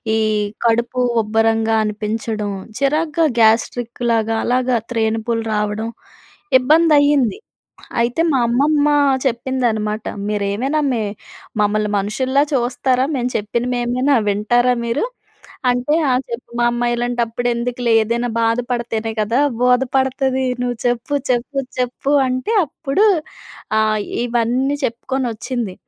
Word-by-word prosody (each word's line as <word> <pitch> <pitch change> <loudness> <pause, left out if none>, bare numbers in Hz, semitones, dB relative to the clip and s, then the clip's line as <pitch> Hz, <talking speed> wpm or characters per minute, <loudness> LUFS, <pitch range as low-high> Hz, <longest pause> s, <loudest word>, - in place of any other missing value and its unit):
ఈ - - +2 0.5
కడుపు 235 +2 +1 0.2
ఉబ్బరంగా 225 +1 +1
అనిపించడం. 215 0 -3 0.3
చిరాకుగా, 305 +3 +1
గ్యాస్ట్రిక్ 230 +2 +2
లాగా, 225 0 +1
అలాగా 250 0 +1
త్రేనుపులు 225 0 -1
రావడం. 210 +1 -1 0.7
ఇబ్బంది 310 +4 +4
అయింది. 285 - +2 0.6
అయితే 245 +7 0
మా 270 - +2
అమ్మమ్మ 285 +5 +2 0.4
చెప్పిందనమాట 235 -4 -1 0.2
"మీరేమైనా 210 +8 -1
మే 230 -3 0 0.6
మమ్మల్ని 210 0 +1
మనుషుల్లా 260 +7 0
చూస్తారా, 255 0 +1
మేం 250 -1 -1
చెప్పినవి 235 +4 -2
ఏమైనా 255 +4 +1
వింటారా 240 +5 +2
మీరు?" 235 +4 -1 0.7
అంటే, 245 +4 0 0.2
ఆ - - +3 0.2
చెప్పు 235 +1 -6
మామ్మా 240 0 +1
ఇలాంటప్పుడు 240 0 -1
ఎందుకులే 240 0 -1
ఏదైనా 235 +2 -1
బాధపడితేనే 230 -1 -1
కదా 230 +5 +1 0.2
బోధపడతది. 265 +1 +1 0.2
నువ్వు 245 -1 -1
చెప్పు, 245 +4 -1 0.2
చెప్పు, 250 +3 -1 0.2
చెప్పు 250 +3 -1
అంటే 255 - -1
అప్పుడు 315 +7 0 0.7
ఆహ్, 215 -1 +2 0.3
ఇవన్నీ 245 +4 0
చెప్పుకొని 255 +2 -3
వచ్చింది. 230 -4 -4
240 Hz, 105 wpm, -19 LUFS, 225-260 Hz, 0.7 s, ఇబ్బంది